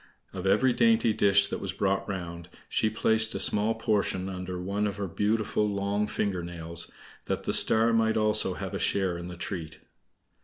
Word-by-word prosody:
Of 95 0 -4
every 115 +6 +3
dainty 225 - +3
dish 100 -1 +4
that - - -3
was - - -4
brought 100 +1 -1
round, 85 -2 -6 0.2
she 110 - +1
placed 110 0 +2
a - - -2
small 105 +2 +3
portion 100 -4 -1
under 90 -1 -5
one 100 +3 -1
of 100 -1 -5
her 100 - -3
beautiful 105 +2 0
long 100 +1 -1
finger 100 -4 -2
nails, 85 -1 -6 0.4
that - - -3
the - - -1
Star 115 +1 +4
might 110 -1 +2
also 105 -3 +1
have - - -6
a - - -3
share 95 -3 0
in 85 0 -6
the 90 -1 -8
treat. 80 -3 -5
100 Hz, 185 wpm, -28 LUFS, 90-110 Hz, 0.4 s, dish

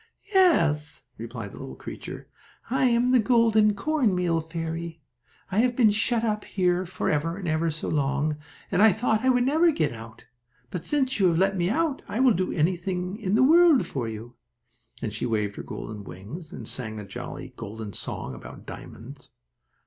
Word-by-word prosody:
"Yes," 160 - +3 0.2
replied 115 -3 -6
the - - -11
little 65 - -7
creature, - - -8 0.4
"I 260 0 +2
am 245 0 +3
the 255 - +6
golden 220 -3 +4
cornmeal 195 - +1
fairy. 165 0 -5 0.5
I 195 - +1
have 245 +1 +3
been 230 -4 +5
shut 225 +2 +1
up 215 -2 0
here 180 -1 0
for 185 +1 -3
ever 165 +4 -1
and 190 -3 -5
ever 160 +1 +1
so 155 0 -4
long, 145 +1 0 0.3
and 190 0 +2
I 220 -2 +7
thought 220 +1 0
I 260 - +3
would 245 -1 +3
never 320 +6 +4
get 155 - 0
out. 115 0 -11 0.5
But, 175 - -5
since 265 -5 0
you 190 - +5
have 165 -2 +2
let 195 +2 +2
me 175 -1 +1
out, 300 +3 0
I 220 - -3
will 260 -3 +5
do 185 0 -1
anything 180 +3 -1
in 200 -2 0
the 255 - +5
world 325 0 +6
for 125 -5 -3
you," 110 +2 -8 0.7
and 110 -3 -2
she 110 +3 -2
waved 105 -3 -1
her - - -4
golden 105 -1 -7
wings, 110 - -9
and - - -8
sang 110 -4 -5
a 105 - -7
jolly, 100 - -7
golden 105 0 -7
song 65 - -5
about - - -11
diamonds. 135 +5 -10
180 Hz, 185 wpm, -26 LUFS, 140-230 Hz, 0.7 s, I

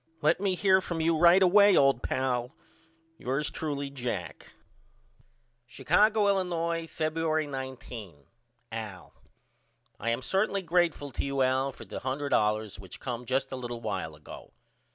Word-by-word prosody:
Let 155 +5 +3
me 195 -2 +1
hear 190 0 +4
from 170 -3 -4
you 165 +1 +2
right 175 +4 +6
away 200 +2 +6
old 135 -3 +4
pal. 125 -1 -1 0.6
Yours 135 +4 -2
truly, 140 -3 -4
JACK. 110 - -5 1.2
Chicago, 210 - +3
Illinois, 170 -4 0
Febuery 155 -1 -1
19. 125 - -7 0.5
AL: - - -7 0.9
I 115 - -2
am 115 +2 -1
certainly 195 +3 0
greatful 170 -5 +1
to - - -3
you 140 -1 0
Al 130 +1 +1
for - - -12
the - - -6
$100 110 -7 0
which 95 -3 -11
come 125 -1 -5
just 135 +2 -1
a - - -3
little 120 -2 -6
while 95 -8 -4
ago. 75 - -12
140 Hz, 135 wpm, -29 LUFS, 125-170 Hz, 1.2 s, right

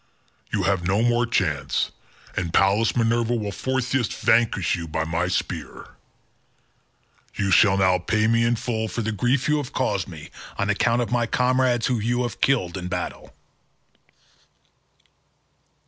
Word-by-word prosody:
You - - 0
have 95 -3 0
no 100 +4 +2
more 120 0 +2
chance, 90 -11 0 0.4
and 85 -3 -2
Pallas 100 +5 +3
Minerva 115 0 +1
will 105 -3 -3
forthwith 130 +1 -1
vanquish 110 -6 +2
you 85 -2 -6
by 80 +1 -2
my 85 +2 -1
spear: 90 - -4 1.5
you 100 0 -1
shall 100 0 +5
now 95 -1 +3
pay 110 +4 0
me 115 +1 +3
in 120 +1 +2
full 110 -1 -2
for 115 +1 -4
the 110 - -1
grief 125 +5 0
you 150 0 +2
have 145 -4 -5
caused - - -1
me - - -10 0.3
on 100 0 0
account 115 +4 +1
of 115 - -6
my 120 -1 +1
comrades 125 -1 +1
whom 120 -4 0
you 120 +3 0
have 120 - -5
killed 100 -10 +1
in 90 -1 -5
battle." 90 0 -5
110 Hz, 150 wpm, -23 LUFS, 95-120 Hz, 1.5 s, shall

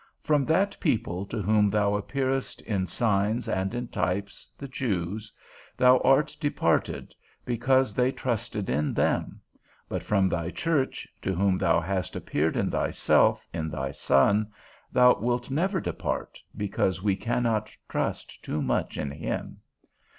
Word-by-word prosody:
From 150 -3 +2
that 195 +5 +2
people 110 - -1
to 110 -1 -3
whom 105 +1 +3
thou 105 0 +2
appearedst 135 +5 -2
in 95 -4 -1
signs 105 +3 0
and 95 +1 -1
in 120 0 -3
types, 100 0 -3
the 140 - -7
Jews, 105 -5 -3 0.5
thou 125 0 +6
art 135 +3 +3
departed, 145 -2 0 0.3
because 125 0 +2
they 125 +3 +2
trusted 110 -6 -3
in 75 +4 0
them; - - 0 0.5
but - - -3
from 100 -2 +2
thy 85 -2 -1
church, 150 - -1
to 95 - -1
whom 95 +1 +2
thou 85 0 +3
hast 90 +1 -3
appeared 80 +2 -1
in - - 0
thyself, - - +2
in 80 -1 -2
thy 70 -3 -3
Son, 100 +11 +3 0.4
thou 125 0 +5
wilt 120 +2 -1
never 185 +7 +1
depart, - - -4 0.2
because 95 -2 -1
we 100 -2 +2
cannot 115 -1 -1
trust - - -3
too 75 - -2
much 65 -2 -1
in 70 - -3
him. - - -4
105 Hz, 145 wpm, -27 LUFS, 95-125 Hz, 0.5 s, thou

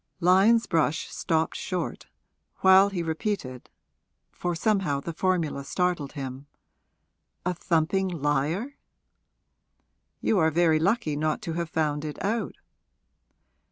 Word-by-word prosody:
Lyon's 195 +6 +5
brush 160 -2 0
stopped 160 -1 -1
short, 180 -2 -4 0.5
while 190 +1 +7
he 180 -4 -3
repeated, 160 - -3 0.6
for 175 -1 -3
somehow 190 -7 +1
the 165 +4 -6
formula 170 -5 0
startled 175 -2 -1
him, 135 -1 -7 1.0
'A 180 - +1
thumping 175 +2 0
liar?' 160 - -1 1.4
'You 210 - +1
are 160 -1 +4
very 160 -1 +3
lucky 180 -3 +1
not 155 +1 0
to 165 - -3
have 170 0 -3
found 150 -2 -1
it 150 -1 -5
out.' 225 +3 -1
170 Hz, 115 wpm, -26 LUFS, 155-190 Hz, 1.4 s, while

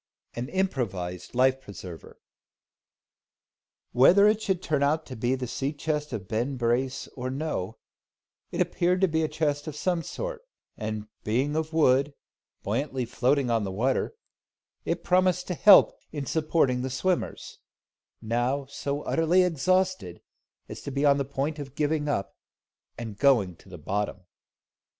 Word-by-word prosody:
AN 120 +3 -4
IMPROVISED 115 - -2
LIFE 130 +1 +3
PRESERVER. 95 -7 -10 1.7
Whether 180 +11 +6
it 215 +1 +2
should 190 -4 -1
turn 150 -2 0
out 155 +3 +1
to 130 - -8
be 120 +3 0
the 130 -1 -4
sea 135 +4 -3
chest 150 0 -2
of 105 -6 -5
Ben 120 +6 -1
Brace 125 +2 0
or 130 0 -5
no, 130 -7 -3 0.7
it - - -2
appeared 180 +1 +1
to 190 - +5
be 160 -1 0
a 155 - +1
chest 150 -1 -1
of 155 - -5
some 175 +2 0
sort; - - -5 0.3
and, 110 -1 -4 0.2
being 130 +7 0
of 160 0 -1
wood, 140 -2 +3 0.5
buoyantly 130 +4 -1
floating 125 +2 +1
on 115 -2 +2
the 100 - -3
water, 130 - 0 0.7
it - - -2
promised 180 0 +2
to - - 0
help 200 +3 +7 0.2
in 145 -2 -4
supporting 150 -5 +1
the 130 - -2
swimmers, 175 +8 -2 0.6
now 120 +5 0
so 140 +1 -4
utterly 165 +3 +3
exhausted 180 - 0 0.5
as - - -8
to - - -6
be 140 +1 0
on 140 -1 +5
the 140 - 0
point 140 +3 -3
of 140 -1 -8
giving 150 0 0
up, 100 -9 -2 0.6
and 110 -4 -7
going 115 -11 +3
to - - -19
the 90 - -9
bottom. 100 +5 -3
140 Hz, 150 wpm, -27 LUFS, 120-160 Hz, 1.7 s, help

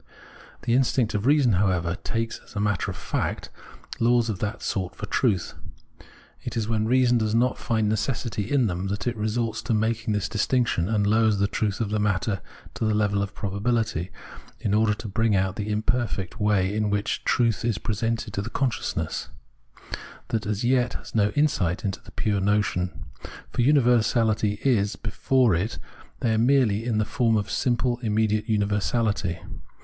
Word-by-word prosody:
The 120 - +1
instinct 125 -2 +2
of 105 +3 -1
reason, 140 -4 +4
however, 90 -3 +1
takes, 115 0 -2
as - - -18
a - - -1
matter 105 -4 0
of - - -5
fact, - - -3 0.5
laws 120 -1 +3
of 95 - -6
that 105 +1 -3
sort 95 -5 -2
for - - -5
truth. 100 -4 0 0.9
It - - -5
is 110 -2 -1
when 110 -1 0
reason 125 0 +4
does 110 0 0
not 125 +2 +2
find 110 -2 0
necessity 110 -1 -1
in 140 -4 +3
them, 90 -1 -2
that 100 +1 -3
it 120 - 0
resorts 110 +1 -1
to 115 - 0
making 110 0 0
this 100 -2 -1
distinction, 110 -4 +1
and 105 -2 +1
lowers 110 0 +3
the 100 +1 +2
truth 100 0 -1
of 110 -3 -2
the 105 - +1
matter 105 0 0 0.3
to - - -4
the 110 -1 +2
level 100 -1 +1
of 100 -1 -4
probabihty, 105 -2 -1 0.5
in 100 - -1
order 105 0 +3
to 110 - -7
bring 110 +1 +1
out 95 0 +1
the 105 0 -4
imperfect 110 -2 -1
way 100 -2 +2
in 105 -1 0
which 105 +1 -1
truth 115 -2 +1
is 115 -3 0
presented 115 0 -2
to 100 - -1
the 105 - -5
consciousness 130 -1 -2 1.0
that 110 -2 -1
as 105 +2 -2
yet 125 0 +2
has - - -9
no 105 -2 +3
insight 105 - +1
into 100 +1 -3
the - - -14
pure 105 -2 0
notion; 95 -3 0 0.5
for - - -1
universahty 115 -5 +3
is 105 -6 +2
before 120 +2 +1
it 90 +7 -1 0.4
there 110 -2 +2
merely 115 -4 +3
iu 120 - 0
the 110 0 +1
form 115 0 +1
of 100 -1 -2
simple 120 -1 0
immediate 110 -1 0
universality. 105 -2 0
110 Hz, 175 wpm, -25 LUFS, 100-115 Hz, 1.0 s, reason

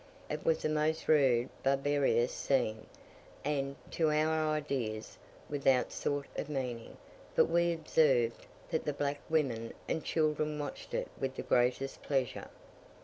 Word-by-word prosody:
It 150 - -3
was 160 - +1
a - - +2
most 155 +1 0
rude, 130 -5 +4
barbarous 135 -2 +2
scene, 115 -5 0 0.6
and, 140 -1 -1 0.2
to 160 -2 +2
our 155 0 +2
ideas, 130 -8 -2 0.3
without 145 -2 +1
any 125 -1 +3
sort 145 -1 -2
of 150 - -3
meaning; 125 -5 -4 0.4
but - - +6
we 170 +1 +2
observed 145 -7 +2 0.2
that 160 - 0
the 150 - 0
black 145 0 -1
women 125 -8 0
and 160 - -1
children 155 -1 0
watched 145 -1 -5
it - - -1
with 135 -1 -2
the - - -4
greatest 125 +2 +1
pleasure. 135 -4 -1
145 Hz, 145 wpm, -32 LUFS, 130-155 Hz, 0.6 s, but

